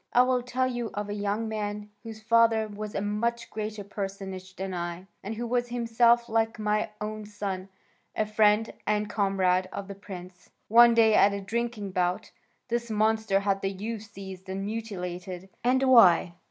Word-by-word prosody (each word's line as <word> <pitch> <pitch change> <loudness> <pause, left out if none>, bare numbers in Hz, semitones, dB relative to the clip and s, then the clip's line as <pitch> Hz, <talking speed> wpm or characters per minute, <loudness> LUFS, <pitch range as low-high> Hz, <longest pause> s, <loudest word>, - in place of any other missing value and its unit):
I 245 - +7
will 255 0 +1
tell 250 +1 -1
you 240 -3 -2
of 205 0 -3
a - - -2
young 205 +2 -1
man 210 -1 -4
whose 220 -1 -9
father 230 -1 +4
was 210 0 -7
a - - 0
much 235 +3 -2
greater 215 -1 -4
personage 195 -2 -6
than 190 0 -4
I, 175 +1 -4 0.2
and 210 +3 -4
who 235 +2 -4
was 240 +1 0
himself, 235 0 +3
like 225 0 0
my 210 0 0
own 215 0 -4
son, 195 -2 -5 0.5
a 215 - +1
friend 215 +1 +3
and 210 0 +1
comrade 190 -3 +1
of 200 -1 -6
the 200 - -6
prince. 185 -2 -11 0.2
One 235 +1 +7
day 220 -1 +5
at 200 -1 +5
a 200 - -2
drinking 225 -1 -3
bout 180 -1 -1 0.4
this 235 -1 -2
monster 215 -2 +2
had 195 -1 0
the 195 - 0
youth 210 +3 -5
seized 190 -1 -9
and 195 +1 -3
mutilated, 185 -4 -5
and 255 +2 +3
why? 205 -10 +6
210 Hz, 175 wpm, -27 LUFS, 195-230 Hz, 0.5 s, I